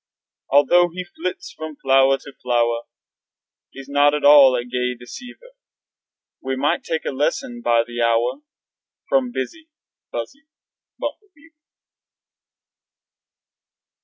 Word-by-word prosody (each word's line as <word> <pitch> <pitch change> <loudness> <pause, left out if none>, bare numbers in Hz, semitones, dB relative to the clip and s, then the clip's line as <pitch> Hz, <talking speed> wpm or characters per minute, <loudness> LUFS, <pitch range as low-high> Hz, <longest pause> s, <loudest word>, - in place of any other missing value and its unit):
Although 175 +5 +4
he 185 - -4
flits 180 +1 -6
from 155 -1 -7
flower 135 0 +3
to 140 +1 -13
flower 120 -1 0 0.8
He's 135 0 -11
not 145 +1 +3
at 150 - -3
all 140 -3 +8
a 120 -1 -2
gay 125 0 -2
deceiver. 245 - -12 0.9
We 130 0 -3
might 145 +6 0
take 160 -1 -3
lessons 240 - -2
by 115 -1 +3
the 120 0 -5
hour 115 - +1 0.7
From 260 -2 +1
busy, 320 +5 -6 0.4
buzzy 275 +1 -7 0.5
Bumblebeaver. 330 -6 -8
145 Hz, 105 wpm, -21 LUFS, -, 0.9 s, all